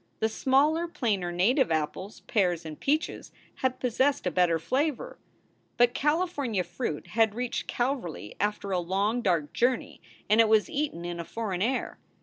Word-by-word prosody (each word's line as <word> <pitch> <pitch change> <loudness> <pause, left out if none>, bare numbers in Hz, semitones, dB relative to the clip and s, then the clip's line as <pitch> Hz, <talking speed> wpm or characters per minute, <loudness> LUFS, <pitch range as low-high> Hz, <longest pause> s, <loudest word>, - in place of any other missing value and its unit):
The 220 - +1
smaller, 290 +8 +2
plainer 205 - -1
native 190 - +2
apples, 160 +6 -2
pears, 180 -6 0
and 155 -1 -7
peaches 305 +3 -1 0.3
had 260 -1 -1
possessed 265 +3 +1
a - - +1
better 175 -2 +3
flavor. 270 - -2 0.6
But 240 0 +4
California 290 - 0
fruit 170 -3 -4
had 220 +1 +2
reached 245 0 -3
Calverly 240 - -3
after 205 -1 -1
a 185 - +1
long, 200 +7 0
dark 170 -8 0
journey, 250 +1 0 0.3
and 215 +2 +5
it 225 - +3
was 220 +7 +3
eaten 285 - -2
in 175 0 -4
a - - -3
foreign 195 -1 -4
air. 255 +5 -1
220 Hz, 155 wpm, -28 LUFS, 180-260 Hz, 0.6 s, and